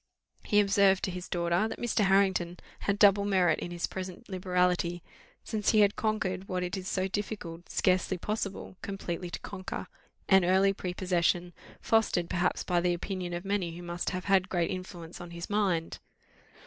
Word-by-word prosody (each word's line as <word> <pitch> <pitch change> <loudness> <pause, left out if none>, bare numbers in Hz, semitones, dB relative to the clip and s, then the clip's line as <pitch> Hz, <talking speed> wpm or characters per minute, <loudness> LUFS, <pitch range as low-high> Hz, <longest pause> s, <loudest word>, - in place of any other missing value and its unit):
He 205 - +3
observed 200 -1 +4
to 190 - 0
his 180 0 -7
daughter, 175 +3 +1
that - - -6
Mr. 230 -3 +1
Harrington 190 -3 +2 0.2
had 200 0 0
double 200 0 +6
merit 185 -5 +3
in - - -5
his 175 0 -2
present 185 -1 -7
liberality, 180 -2 0 0.4
since 215 -3 -1
he 215 -2 +5
had 205 0 +4
conquered 195 -4 -1
what 180 -1 -2
it 180 -1 -2
is 190 -1 -5
so 190 0 0
difficult, 190 -4 -5
scarcely 185 0 +1
possible, 200 -1 -4
completely 185 -3 -4
to - - -5
conquer 185 -2 -6 0.4
an 190 -1 +6
early 190 +2 +4
prepossession, 180 -1 0 0.3
fostered 215 -6 +2
perhaps 180 0 0
by 175 -1 +1
the 175 0 +2
opinion 180 0 -4
of 175 +2 -6
many 190 -4 -1
who 175 - -8
must 175 0 -3
have 185 -1 -4
had 195 -1 +3
great 175 -2 0
influence 180 -3 -7
on 175 - -8
his 170 +3 -7
mind. 190 -6 0
185 Hz, 175 wpm, -30 LUFS, 175-195 Hz, 0.4 s, double